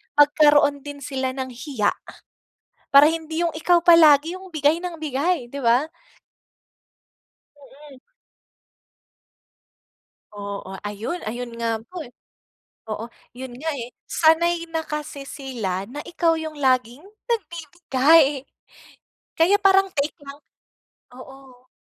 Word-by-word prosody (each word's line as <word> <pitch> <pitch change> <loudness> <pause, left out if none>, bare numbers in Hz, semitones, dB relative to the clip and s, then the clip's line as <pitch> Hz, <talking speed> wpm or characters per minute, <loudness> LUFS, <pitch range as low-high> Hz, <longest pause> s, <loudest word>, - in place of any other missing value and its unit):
magkaroon 290 -1 +4
din 290 -1 -8
sila 260 -1 -3
ng 260 -1 -4
hiya, 245 -4 -1 1.0
para 280 +1 +9
hindi 320 0 -4
yung 335 - 0
ikaw 340 +2 +2
palagi 320 -2 +6
yung 380 - -12
bigay 305 +1 +2
ng 360 -2 -5
bigay, 300 0 -1
'di 280 - -7
ba. 240 +4 +3 1.7
Mm. 285 0 -16 2.4
Oo, 200 -2 -7
ayon 210 - -5
ayon, 240 +2 -5
nga 230 -1 -2
po 360 -2 -8
eh 245 - -13 0.8
oo, 215 +2 -4 0.3
yon 260 0 -7
nga 320 +4 -3
eh. 245 -2 -6 0.2
Sanay 335 +1 +3
na 325 -1 -2
kasi 295 -2 -6
sila 225 -10 -4
na 290 - -8
ikaw 335 -1 +1
yung 315 -1 -6
laging 255 -1 0 0.3
nagbibigay 315 - +2 0.9
kaya 355 +5 +5
parang 390 0 +4
take 290 +1 -1
lang 280 +1 -10 0.8
oo. 260 -1 -15
285 Hz, 115 wpm, -22 LUFS, 255-325 Hz, 2.4 s, para